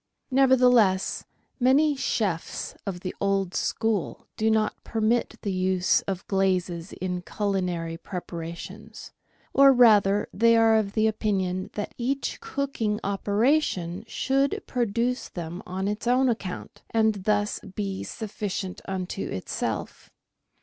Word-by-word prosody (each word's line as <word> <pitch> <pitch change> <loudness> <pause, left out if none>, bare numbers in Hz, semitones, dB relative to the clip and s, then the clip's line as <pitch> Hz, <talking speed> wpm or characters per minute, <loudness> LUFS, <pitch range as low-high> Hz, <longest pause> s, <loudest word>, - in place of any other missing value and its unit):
Nevertheless, 250 -7 +4 0.3
many 280 +4 +4
chefs 200 -10 -2
of 180 -3 -4
the 185 - -4
old 195 -2 +1
school 220 -5 -1
do 220 0 +1
not 220 -1 0
permit 225 +1 0
the 200 - -1
use 185 0 +2
of 190 -2 -3
glazes 185 -3 0
in 180 -1 -3
culinary 180 -4 -2
preparations, 180 +5 -7 0.4
or, 275 0 +8
rather, 210 -5 +5
they 230 +2 +4
are 225 -1 +5
of 205 0 -2
opinion 200 -4 0
that 210 - -4
each 270 +3 -2
cooking 275 - -2
operation 200 - +1
should 275 +3 0
produce 240 +1 -1
them 175 0 -6
on 190 +2 -2
its 210 +3 -3
own 255 +1 +4
account, 205 -6 -4
and 220 -4 +1
thus 210 -1 +1
be 195 0 -5
sufficient 205 -3 -5
unto 190 0 -3
itself. 95 - -4
205 Hz, 115 wpm, -26 LUFS, 185-230 Hz, 0.4 s, or